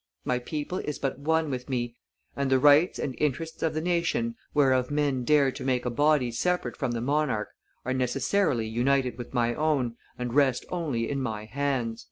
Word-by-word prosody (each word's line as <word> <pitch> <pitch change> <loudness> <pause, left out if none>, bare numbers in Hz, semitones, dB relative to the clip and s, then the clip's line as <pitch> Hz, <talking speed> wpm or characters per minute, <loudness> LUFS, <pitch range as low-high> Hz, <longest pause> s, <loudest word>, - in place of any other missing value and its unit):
My 125 -1 +1
people 150 +7 -4
is 150 - -4
but 135 -1 -3
one 160 +1 +1
with 125 0 -5
me, 120 -2 -2 0.4
and 140 -1 -1
the 130 - +4
rights 145 +5 +5
and 135 - -3
interests 155 +3 -2
of 160 -1 0
the 155 - 0
nation 180 +7 0 0.2
whereof 130 -3 +3
men 145 -3 0
dare 140 0 +4
to - - -8
make 125 -2 0
a 125 - 0
body 145 -1 +2
separate 130 +1 -1
from - - -2
the 120 -1 -2
monarch 140 -4 0 0.4
are 130 - 0
necessarily 130 - +1
united 125 +2 +1
with 120 +2 -7
my 120 -1 +2
own, 135 -5 0 0.2
and 125 -1 -3
rest 135 -3 +3
only 145 -10 -1
in 140 -1 -2
my 110 -4 -3
hands." 125 -2 -2
135 Hz, 190 wpm, -27 LUFS, 125-150 Hz, 0.4 s, rights